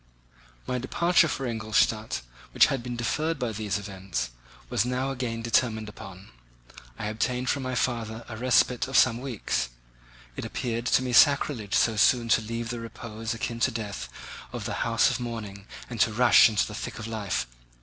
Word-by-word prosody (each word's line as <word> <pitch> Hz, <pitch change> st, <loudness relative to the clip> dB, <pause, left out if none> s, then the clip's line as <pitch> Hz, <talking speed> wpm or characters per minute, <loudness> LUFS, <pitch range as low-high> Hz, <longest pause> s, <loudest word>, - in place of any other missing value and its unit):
My 125 Hz, -, -2 dB
departure 170 Hz, +6 st, +3 dB
for 135 Hz, -2 st, -3 dB
Ingolstadt, 110 Hz, -, 0 dB, 0.3 s
which -, -, +8 dB
had 135 Hz, -, -2 dB
been 120 Hz, 0 st, -5 dB
deferred 155 Hz, +7 st, -1 dB
by 125 Hz, -3 st, -2 dB
these 105 Hz, -2 st, -2 dB
events, 95 Hz, -11 st, -4 dB, 0.4 s
was -, -, +1 dB
now 125 Hz, +2 st, -1 dB
again 120 Hz, -3 st, -3 dB
determined 115 Hz, -2 st, +1 dB
upon. 95 Hz, -3 st, -11 dB, 0.7 s
I -, -, -5 dB
obtained 125 Hz, +4 st, -1 dB
from 140 Hz, -, -2 dB
my 130 Hz, -1 st, -3 dB
father 115 Hz, -2 st, -2 dB
a 110 Hz, -, -7 dB
respite 125 Hz, +1 st, +2 dB
of 135 Hz, -, +1 dB
some 120 Hz, -1 st, +4 dB
weeks. 120 Hz, -, -2 dB, 0.7 s
It -, -, -5 dB
appeared 120 Hz, 0 st, -3 dB
to 130 Hz, -, +3 dB
me 125 Hz, -1 st, -2 dB
sacrilege 140 Hz, -6 st, +4 dB
so 110 Hz, -2 st, +3 dB
soon 115 Hz, +2 st, +4 dB
to 110 Hz, -, +4 dB
leave 115 Hz, +1 st, -4 dB
the 120 Hz, -, -4 dB
repose, 115 Hz, 0 st, -6 dB
akin 115 Hz, 0 st, -4 dB
to -, -, +3 dB
death, 105 Hz, -4 st, -5 dB, 0.4 s
of -, -, -5 dB
the -, -, -2 dB
house 115 Hz, 0 st, +3 dB
of -, -, -2 dB
mourning 110 Hz, -4 st, -6 dB, 0.2 s
and 120 Hz, -2 st, -7 dB
to 110 Hz, -, +4 dB
rush 120 Hz, +1 st, +6 dB
into 105 Hz, -2 st, +1 dB
the 105 Hz, -, -8 dB
thick -, -, -6 dB
of 110 Hz, -, -6 dB
life. 110 Hz, -, -2 dB
115 Hz, 180 wpm, -27 LUFS, 110-125 Hz, 0.7 s, which